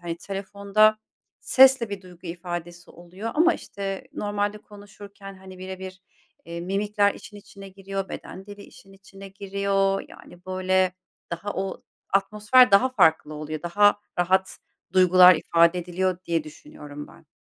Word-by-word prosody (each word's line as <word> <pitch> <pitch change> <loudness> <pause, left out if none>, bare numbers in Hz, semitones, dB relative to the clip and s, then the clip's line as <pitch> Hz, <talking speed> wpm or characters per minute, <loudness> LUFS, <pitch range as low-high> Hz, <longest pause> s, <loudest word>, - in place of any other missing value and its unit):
hani, 170 -1 -5
telefonda 200 +3 +1 0.4
sesle 260 -4 +5
bir 200 -1 -6
duygu 180 0 -14
ifadesi 175 0 -7
oluyor 180 +6 -8
ama, 340 +3 +4
işte, 195 -6 -7
normalde 205 0 -2
konuşurken, 205 -1 -13
hani, 190 -1 -13
bire 185 0 -7
bir, 185 -1 -10 0.4
eee, 170 0 -6
mimikler 200 +3 0
işin 210 - -13
içine 200 -1 -13
giriyor, 195 0 -6
beden 190 +1 -9
dili 205 0 -11
işin 195 -1 -17
içine 195 0 -13
giriyor. 195 0 -1
Yani, 175 0 -16
böyle, 185 0 +1 0.4
daha 195 +5 -4
o 190 0 -4 0.3
atmosfer 210 +5 +4
daha 200 +6 +5
farklı 160 - +2
oluyor. 155 0 -6
Daha 205 +4 +3 0.2
rahat 185 +2 +1 0.3
duygular 185 0 +7
ifade 170 +2 +2
ediliyor 180 +1 -2
diye 165 -3 -1
düşünüyorum 145 -1 -11
ben. - - -19
195 Hz, 140 wpm, -24 LUFS, 180-205 Hz, 0.4 s, duygular